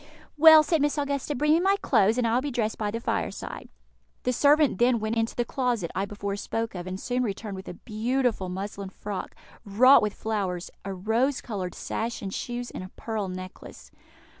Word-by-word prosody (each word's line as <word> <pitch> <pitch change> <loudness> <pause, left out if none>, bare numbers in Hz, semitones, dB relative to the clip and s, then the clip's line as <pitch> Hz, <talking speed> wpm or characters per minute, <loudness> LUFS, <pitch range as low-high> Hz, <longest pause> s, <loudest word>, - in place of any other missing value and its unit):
"Well," 315 0 +9
said 320 -1 +1
Miss 295 +1 +1
Augusta, 285 0 -1
"bring 300 +4 +3
me 325 - +4
my 385 +2 +3
clothes, 220 -2 +3
and 250 - +1
I 225 - +1
will 250 - +3
be 290 - -3
dressed 230 -4 -2
by 210 -1 -1
the 230 +2 -3
fireside." - - -4 0.5
The 250 - +1
servant 290 -4 +4
then 240 -1 +4
went 215 +1 -2
into 225 0 -1
the 240 - 0
closet 240 -9 -1
I 195 - -1
before 200 0 -4
spoke 225 +2 -3
of, 180 -1 -6
and 185 +1 -5
soon 250 +3 -1
returned 210 -2 -3
with 190 - -9
a - - -6
beautiful 230 -1 -1
muslin 195 +1 -5
frock, 200 0 -6 0.3
wrought 245 +7 +6
with 210 -1 -1
flowers, 195 -5 -3
a 195 - -4
rose 225 +8 0
coloured 190 -6 -5
sash 230 0 -4
and 195 -1 -4
shoes, 245 0 -4
and - - -6
a 185 - -9
pearl 220 -3 -3
necklace. 185 0 -9
225 Hz, 200 wpm, -26 LUFS, 195-255 Hz, 0.5 s, Well